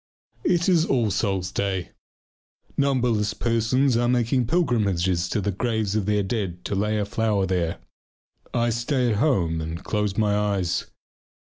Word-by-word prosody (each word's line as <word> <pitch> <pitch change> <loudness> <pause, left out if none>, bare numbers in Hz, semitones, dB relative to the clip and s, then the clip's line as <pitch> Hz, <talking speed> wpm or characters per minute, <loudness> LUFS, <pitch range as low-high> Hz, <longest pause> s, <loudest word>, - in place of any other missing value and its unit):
It 175 -1 +2
is 175 -4 +4
all 120 -9 +1
souls' 95 -3 -1
day. 95 -3 -2 0.8
Numberless 120 -7 +1
persons 120 +4 +1
are 120 +1 +2
making 120 0 +1
pilgrimages 100 - +1
to 105 - 0
the 100 +1 -1
graves 110 0 -1
of 105 -2 0
their 105 -1 +2
dead 95 -4 -3
to - - -2
lay 105 +2 0
a 105 - 0
flower 105 -2 0
there. 90 -2 -1 0.7
I 120 0 +1
stay 120 +1 0
at 105 - 0
home 90 - +1
and 80 +1 -5
close 105 -2 -1
my 105 -2 +2
eyes. 100 -4 0
105 Hz, 150 wpm, -24 LUFS, 95-120 Hz, 0.8 s, is